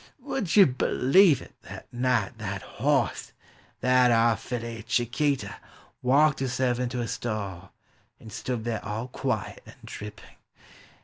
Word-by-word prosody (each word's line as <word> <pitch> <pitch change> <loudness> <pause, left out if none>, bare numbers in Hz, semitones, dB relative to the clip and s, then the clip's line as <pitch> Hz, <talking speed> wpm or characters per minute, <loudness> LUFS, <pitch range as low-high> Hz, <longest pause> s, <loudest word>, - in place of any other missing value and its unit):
Would 195 -11 -2
ye 205 - +9
b'lieve 140 +3 +4
it, - - -16
that - - -10
night, 120 -3 0
that 100 -2 -4
hoss, 135 -3 -1 0.2
— - - -31
that 125 0 +4
ar' 115 -1 +4
filly, 115 -2 -5
— - - -33
Chiquita, 125 +5 0 0.3
— - - -32
Walked 145 +4 +3
herself 125 -1 0
into 125 0 -2
her 120 -1 -2
stall, 100 -7 -4 0.5
and 110 -2 -12
stood 125 -1 -3
there 115 -2 -3
all 110 +3 -4
quiet 125 -3 -3
and - - -13
dripping! 105 0 -10
120 Hz, 145 wpm, -27 LUFS, 110-130 Hz, 0.5 s, ye